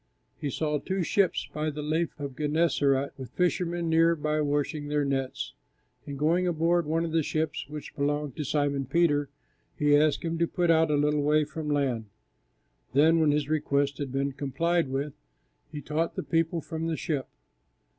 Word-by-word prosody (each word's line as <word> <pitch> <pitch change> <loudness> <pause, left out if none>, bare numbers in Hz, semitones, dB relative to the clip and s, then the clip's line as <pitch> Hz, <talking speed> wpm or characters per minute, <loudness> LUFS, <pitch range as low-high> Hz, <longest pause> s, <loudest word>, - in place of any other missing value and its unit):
He 145 - -4
saw 150 +2 -1
two 190 +3 -2
ships 190 +2 +1
by 155 +1 -1
the 150 0 -5
Lake 160 +2 0
of 140 -3 -6
Gennesaret 145 -2 +1
with 130 - -7
the - - -37
fishermen 175 -1 0
near 165 +1 +4
by 155 0 -1
washing 145 0 -1
their 145 0 0
nets, 135 -1 -2 0.5
and 140 -1 -5
going 170 +5 +2
aboard 170 0 +1
one 165 +2 +1
of 165 - -4
the 165 0 +2
ships, 155 +1 -2
which 150 0 -8
belonged 145 -1 -1
to 150 - -2
Simon 140 -1 0
Peter, 145 -4 +2 0.5
He 145 -1 +4
asked 150 0 +3
him 165 0 -2
to 170 - +2
put 175 0 +1
out 160 -1 +4
a 150 - +2
little 150 0 +2
way 150 +1 +3
from 155 0 -5
land; 135 -6 0 0.9
then, 160 +4 +5
when 155 -2 +4
His 145 -1 +1
request 145 -2 0
had 140 -3 -3
been 140 +1 0
complied 165 +5 0
with, 135 +2 -2 0.6
He 150 -1 -6
taught 155 +4 -1
the - - -3
people 165 0 0
from 160 +1 -4
the 160 -1 -1
ship. 145 -5 -2
150 Hz, 185 wpm, -28 LUFS, 145-165 Hz, 0.9 s, then